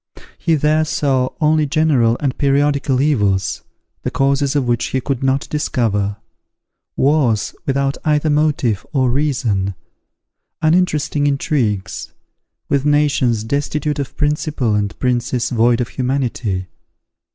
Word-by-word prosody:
He 165 Hz, -2 st, +2 dB
there 155 Hz, +1 st, +2 dB
saw 135 Hz, -4 st, 0 dB
only 155 Hz, -1 st, +2 dB
general 140 Hz, -7 st, +2 dB
and 135 Hz, -3 st, -1 dB
periodical 140 Hz, -1 st, +1 dB
evils, 100 Hz, -, +1 dB, 0.4 s
the -, -, -2 dB
causes 140 Hz, +1 st, +1 dB
of 135 Hz, -4 st, +1 dB
which 120 Hz, -1 st, +1 dB
he 130 Hz, -, -1 dB
could 130 Hz, 0 st, -3 dB
not 135 Hz, +1 st, 0 dB
discover; 110 Hz, -9 st, -1 dB, 0.8 s
wars 135 Hz, -7 st, +2 dB
without 140 Hz, 0 st, 0 dB
either 150 Hz, 0 st, +1 dB
motive 145 Hz, -9 st, +1 dB
or 130 Hz, -3 st, +2 dB
reason; 120 Hz, -9 st, 0 dB, 0.8 s
uninteresting 155 Hz, -3 st, +1 dB
intrigues; 130 Hz, -8 st, -1 dB, 0.5 s
with 140 Hz, -1 st, +1 dB
nations 145 Hz, -6 st, +2 dB
destitute 145 Hz, +4 st, -2 dB
of 140 Hz, -, -5 dB
principle, 150 Hz, -5 st, 0 dB
and 105 Hz, -1 st, -1 dB
princes 125 Hz, 0 st, -1 dB
void 120 Hz, 0 st, +3 dB
of 120 Hz, -4 st, -2 dB
humanity. 125 Hz, -7 st, -2 dB
135 Hz, 120 wpm, -18 LUFS, 120-150 Hz, 0.8 s, void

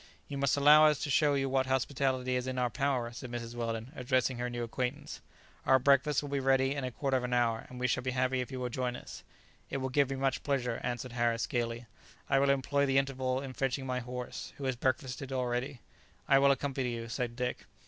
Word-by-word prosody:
"You 140 Hz, -, -6 dB
must 140 Hz, 0 st, +2 dB
allow 150 Hz, +2 st, +8 dB
us 150 Hz, -2 st, +3 dB
to 145 Hz, -, -2 dB
show 145 Hz, +1 st, +4 dB
you 135 Hz, -1 st, 0 dB
what 130 Hz, 0 st, +1 dB
hospitality 130 Hz, -1 st, 0 dB
is 125 Hz, 0 st, -1 dB
in 130 Hz, 0 st, -3 dB
our 125 Hz, -1 st, +1 dB
power," 125 Hz, 0 st, 0 dB
said 120 Hz, +2 st, -8 dB
Mrs. 120 Hz, -1 st, -5 dB
Weldon, 115 Hz, 0 st, -3 dB
addressing 125 Hz, -1 st, 0 dB
her 125 Hz, 0 st, -1 dB
new 120 Hz, 0 st, -3 dB
acquaintance; 125 Hz, +2 st, -4 dB, 0.4 s
"our 130 Hz, -, +5 dB
breakfast 140 Hz, +2 st, +3 dB
will 145 Hz, -, -5 dB
be 140 Hz, -, 0 dB
ready 135 Hz, 0 st, +3 dB
in 140 Hz, -2 st, -3 dB
a 130 Hz, -, -1 dB
quarter 135 Hz, +2 st, 0 dB
of 125 Hz, -, -3 dB
an 125 Hz, 0 st, -2 dB
hour, 115 Hz, -2 st, +1 dB
and 125 Hz, -, -9 dB
we 125 Hz, -, -1 dB
shall 125 Hz, 0 st, +1 dB
be 130 Hz, -, -2 dB
happy 130 Hz, 0 st, +1 dB
if 125 Hz, -, -6 dB
you 130 Hz, -, -4 dB
will 125 Hz, -1 st, -2 dB
join 125 Hz, 0 st, -2 dB
us." -, -, -9 dB, 0.5 s
"It -, -, -2 dB
will 130 Hz, 0 st, -2 dB
give 140 Hz, +1 st, +2 dB
me 135 Hz, -, -2 dB
much 135 Hz, -1 st, 0 dB
pleasure," 125 Hz, -5 st, -1 dB
answered 125 Hz, 0 st, -3 dB
Harris, 120 Hz, -1 st, +1 dB
gaily; 120 Hz, 0 st, -2 dB, 0.5 s
"I 135 Hz, -, +5 dB
will 140 Hz, 0 st, +3 dB
employ 140 Hz, +1 st, +2 dB
the 135 Hz, 0 st, +2 dB
interval 130 Hz, -1 st, 0 dB
in 135 Hz, -2 st, -6 dB
fetching 135 Hz, +1 st, -1 dB
my 125 Hz, -1 st, -1 dB
horse, 125 Hz, 0 st, -6 dB
who 140 Hz, -, -8 dB
has 130 Hz, -1 st, 0 dB
breakfasted 130 Hz, +1 st, -2 dB
already." 125 Hz, +1 st, -2 dB, 0.5 s
"I 135 Hz, -, +6 dB
will 140 Hz, 0 st, +5 dB
accompany 135 Hz, -3 st, 0 dB
you," 115 Hz, 0 st, -6 dB
said 120 Hz, 0 st, -3 dB
Dick. 125 Hz, 0 st, -3 dB
130 Hz, 230 wpm, -31 LUFS, 125-135 Hz, 0.5 s, allow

